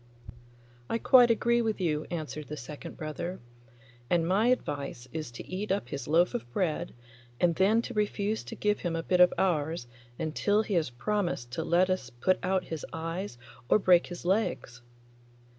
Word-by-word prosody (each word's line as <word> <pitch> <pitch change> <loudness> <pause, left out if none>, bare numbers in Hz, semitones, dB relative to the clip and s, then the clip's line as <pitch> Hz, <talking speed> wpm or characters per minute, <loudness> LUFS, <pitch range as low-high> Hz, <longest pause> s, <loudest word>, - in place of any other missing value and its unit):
'I 230 - +1
quite 245 0 +6
agree 235 +1 +3
with 220 -2 -1
you,' 155 -4 -1
answered 155 -3 -5
the 150 - -6
second 145 +3 -8
brother, 170 +4 -5 0.7
'and 170 -2 +2
my 200 +6 +3
advice 140 - -1
is 155 -5 -4
to 120 - -10
eat 190 +2 -3
up 190 -11 -1
his 140 - -5
loaf 170 +4 +3
of 120 +1 -5
bread, 160 +2 -1 0.4
and 175 -1 +3
then 205 +6 +3
to 245 - -6
refuse 210 0 -1
to 230 - -7
give 210 -1 0
him 170 -2 -2
a 165 - -2
bit 180 +1 +1
of 180 0 +7
ours 160 -6 0 0.3
until 205 +7 +1
he 215 - -4
has 165 -6 +1
promised 130 - -2
to 160 +6 -2
let 180 +3 +3
us 185 -10 -2
put 125 +10 +1
out 185 0 +1
his 160 -3 -6
eyes 165 -2 -4 0.3
or - - +6
break 180 -4 +4
his 175 -1 -8
legs. 185 - -1
175 Hz, 175 wpm, -29 LUFS, 155-205 Hz, 0.7 s, of